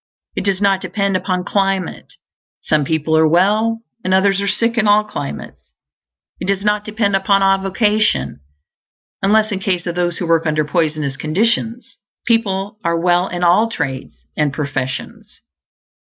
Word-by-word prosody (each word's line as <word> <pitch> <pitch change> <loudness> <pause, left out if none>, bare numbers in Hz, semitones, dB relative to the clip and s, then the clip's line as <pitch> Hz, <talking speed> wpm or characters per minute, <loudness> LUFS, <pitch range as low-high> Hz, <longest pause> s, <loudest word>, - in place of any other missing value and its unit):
It - - -2
does 195 -2 +1
not 195 -1 +2
depend 195 +1 -1
upon 185 -1 -1
climate; 195 -2 -2 0.5
some 155 -1 +1
people 160 +1 0
are 160 0 +5
well 215 +7 +2 0.2
and 185 +1 +2
others 195 +1 +2
are 200 - -2
sick 230 +4 +1
in 220 -2 +2
all 210 +1 +5
climates. 145 -9 -7 0.7
It - - -5
does 195 +1 -1
not 210 0 +1
depend 210 -2 0
upon 195 0 +2
avocation, 195 - +1 0.8
unless 215 +2 +3
in 195 - -2
case 185 -3 -1
of 175 - -2
those 175 -1 -1
who 180 - -3
work 165 -1 +2
under 155 0 +1
poisonous 150 -3 -1
conditions; 225 - -1 0.3
people 210 -3 0
are 170 0 0
well 175 +1 +2
in 180 0 -4
all 180 +6 +4
trades 135 - -5
and 150 -2 +1
professions. 135 -2 -5
190 Hz, 155 wpm, -18 LUFS, 165-210 Hz, 0.8 s, are